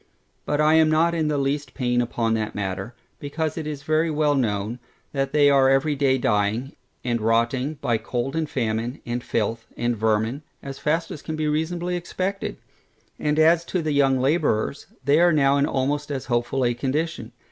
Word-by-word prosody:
But 145 - 0
I 155 +1 +4
am 160 -1 +5
not 165 +2 +3
in 160 -2 0
the 150 -1 0
least 140 +1 -2
pain 120 -2 +1
upon 115 -1 -1
that 110 -1 -2
matter, 95 +3 -4 0.2
because 155 +2 -3
it 160 -2 -4
is 145 -2 -5
very 155 +2 +1
well 150 -1 +2
known, 110 -3 -1 0.3
that 135 -1 -1
they 145 -1 +5
are 135 -2 +5
every 135 +2 +2
day 135 -1 +2
dying, 110 +3 0 0.3
and 120 -2 -1
rotting, 115 +6 +1
by 115 -2 +1
cold 125 +5 -3
and 160 -2 -1
famine, 115 +1 -2
and 120 0 -3
filth, 115 +1 -2
and 120 0 0
vermin, 110 +5 0 0.2
as 135 -1 -7
fast 165 +2 0
as 150 - -7
can 160 - -5
be 155 -1 -1
reasonably 170 +4 -1
expected. 185 +3 -3 0.6
And 150 0 0
as 165 +2 +5
to 180 -1 -2
the 155 - -1
young 135 -2 +3
labourers, 140 -3 0 0.2
they 145 +3 +4
are 175 0 +5
now 140 -2 +3
in 140 +1 +2
almost 145 +2 -1
as 135 -3 -3
hopeful 120 +1 0
a 120 - +2
condition. 135 0 -2
140 Hz, 190 wpm, -24 LUFS, 120-155 Hz, 0.6 s, am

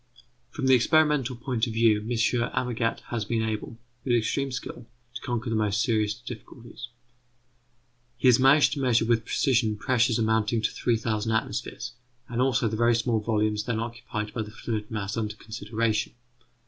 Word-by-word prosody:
From 140 - -4
the 130 - +5
experimental 140 0 +3
point 120 -1 -1
of 115 - -4
view, 110 -2 +4
M. 105 - -8 0.4
Amagat 120 -2 -1
has 115 -3 -1
been 110 +2 -1
able, 110 +1 -4 0.3
with 125 -2 +2
extreme 135 +4 0
skill, 120 -1 -6 0.3
to 115 - -7
conquer 120 -1 -3
the - - 0
most 105 -2 +1
serious 110 -4 +1
difficulties. 120 +1 -10 1.3
He 130 - +2
has 125 -1 +6
managed 135 +3 +5
to 145 - -4
measure 120 -3 +3
with 115 -1 +1
precision 115 -7 +1
pressures 120 0 +2
amounting 110 0 +1
to - - +1
3000 115 -2 -1
atmospheres, 110 - -2 0.4
and 120 0 -2
also 125 -3 +2
the 110 - -2
very 120 +1 +3
small 115 -1 +1
volumes 105 -1 0
then 115 -3 -1
occupied 115 -2 -5
by 115 - -2
the 105 - -6
fluid 110 -1 -4
mass 105 -2 -3
under 105 -2 -2
consideration. 110 0 -2
115 Hz, 165 wpm, -26 LUFS, 110-120 Hz, 1.3 s, has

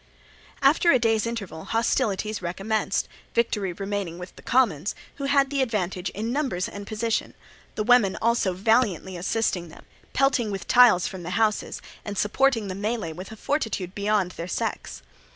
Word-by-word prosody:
After 300 +5 +5
a 265 - +6
day's 225 -2 +1
interval 200 -9 -5
hostilities 220 -3 0
recommenced, 195 +4 -1 0.3
victory 210 -5 +1
remaining 195 -2 -4
with 180 +1 -9
the - - -13
commons, 205 - +1 0.2
who 280 - -3
had 275 0 +3
the 280 -1 +1
advantage 190 -7 -1
in 220 +4 -4
numbers 260 -10 -1
and 205 0 -8
position, 225 +1 -2 0.4
the 215 - -1
women 230 -4 +4
also 230 -5 +2
valiantly 195 -2 +1
assisting 180 -1 -1
them, - - -14 0.3
pelting 265 -5 +2
with 195 -3 -5
tiles 245 -8 +6
from 190 - -5
the 175 - -6
houses, 220 -2 0 0.2
and 205 -1 -5
supporting 225 +1 +2
the 185 - -3
melee 205 -3 -2
with 185 +6 -9
a - - -7
fortitude 210 - -2
beyond 200 -2 +1
their 170 -1 -6
sex. - - -4
210 Hz, 160 wpm, -25 LUFS, 185-235 Hz, 0.4 s, a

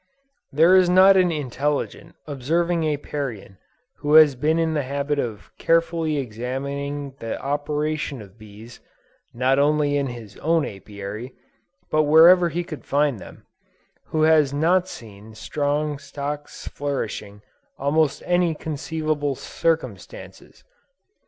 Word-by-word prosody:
There 165 +6 +5
is 185 -1 +5
not 190 +2 +7
an 180 -2 +3
intelligent, 150 +3 -3
observing 160 +4 0
Apiarian 135 -9 -5 0.4
who 150 0 +1
has 155 -3 +8
been 150 +6 0
in 165 -1 0
the 150 - 0
habit 140 +2 -2
of 110 -6 -5
carefully 165 -2 +1
examining 140 +3 -4
the 115 -1 -5
operations 145 -2 -3
of 100 -1 -17
bees, 110 +3 -13 0.5
not 130 +3 +1
only 145 0 +2
in 140 -1 -1
his 115 -5 -9
own 165 -1 +1
Apiary, 100 +5 -8 0.6
but 155 - +3
wherever 170 +3 +7
he 175 +2 -3
could 155 -3 -9
find 140 -4 0
them, - - -13 0.6
who 155 -1 -1
has 155 -3 +4
not 170 +6 +2
seen 110 - -12
strong 145 +5 -2
stocks 145 +1 -7
flourishing 135 -8 -4 0.4
under - - -10
almost 150 0 +1
any 175 -2 +1
conceivable 155 -1 -3
circumstances. 165 - -4
145 Hz, 125 wpm, -23 LUFS, 130-160 Hz, 0.6 s, has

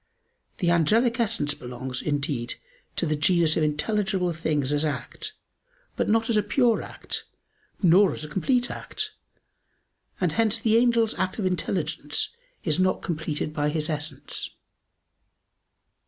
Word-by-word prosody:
The 175 -4 +2
angelic 225 - +3
essence 215 -11 +1
belongs, 125 0 -6
indeed, 140 -5 -1 0.4
to - - +1
the 155 - +1
genus 160 +1 +3
of - - +1
intelligible 185 +4 0
things 150 -4 0
as 145 +1 +2
act, 150 - -3 0.6
but - - 0
not 225 +1 +3
as 230 - +2
a 210 - +5
pure 230 +3 +2
act, - - -5 0.6
nor 185 +3 +6
as - - -5
a - - -5
complete 245 - +1
act, 430 0 -3 1.1
and 180 -4 +1
hence 225 +4 +2
the 225 -1 +2
angel's 230 -2 +4
act 185 0 -1
of 210 - -1
intelligence 185 - -1 0.3
is 160 0 +1
not 185 0 +2
completed 155 -3 -3
by 150 -1 +1
his 155 +1 0
essence. 150 -2 -3
175 Hz, 140 wpm, -26 LUFS, 150-220 Hz, 1.1 s, nor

